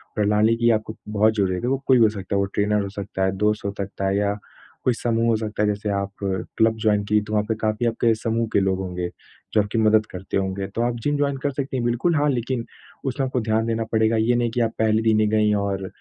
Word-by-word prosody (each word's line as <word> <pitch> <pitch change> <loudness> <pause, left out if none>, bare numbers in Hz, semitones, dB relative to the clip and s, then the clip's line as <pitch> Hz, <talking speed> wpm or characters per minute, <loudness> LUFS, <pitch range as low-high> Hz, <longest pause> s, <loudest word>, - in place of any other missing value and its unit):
प्रणाली 105 +2 +3
की 120 0 +3
आपको 110 0 -1
बहुत 110 +1 +3
ज़रूरत 95 -2 0
है, 125 - 0
वो 135 - +1
कोई 130 - +6
भी 120 - +5
हो 110 - +5
सकता 100 -2 -4
है, - - +2
वो 100 - +2
ट्रेनर 105 0 +2
हो 100 - -4
सकता 100 -1 -4
है, 95 - +1
दोस्त 105 +1 0
हो 100 - 0
सकता 100 0 -3
है 95 +1 +1
या 100 0 +1 0.5
कोई 125 - +4
समूह 115 0 0
हो 115 - +3
सकता 110 -1 -3
है। - - +2
जैसे 105 +1 -2
आप 100 0 -4 0.5
क्लब 110 0 +3
जॉइन 105 -1 +3
की 105 0 +4
तो 105 +1 -7
वहाँ 105 -1 +2
पे 110 - +1
काफ़ी 110 +2 0
आपके 115 0 +2
समूह 115 +1 -1
के - - +4
लोग 95 -1 0
होंगे, 90 -2 -3 0.5
जो 105 - +5
आपकी 105 +3 -3
मदद 110 0 +4
करते 90 +1 -4
होंगे। 95 0 -2
तो 115 - -4
आप 120 0 0
जिम 145 0 +1
जॉइन 140 -1 0
कर 145 - +1
सकती 135 -1 -3
हैं, 120 - -1
बिल्कुल 120 +8 +1
हाँ, 145 0 +2
लेकिन 120 -1 -2 0.4
उसमें 135 +1 -1
आपको 130 -1 -1
ध्यान 110 0 0
देना 115 0 0
पड़ेगा। 110 0 +2
ये 115 +2 +2
नहीं 120 -1 +1
कि 120 - -1
आप 115 -1 +1
पहले 110 0 +3
दिन 110 -1 +3
ही 110 - +3
गईं 105 0 +2
और 100 -1 -2
110 Hz, 260 wpm, -23 LUFS, 100-115 Hz, 0.5 s, कोई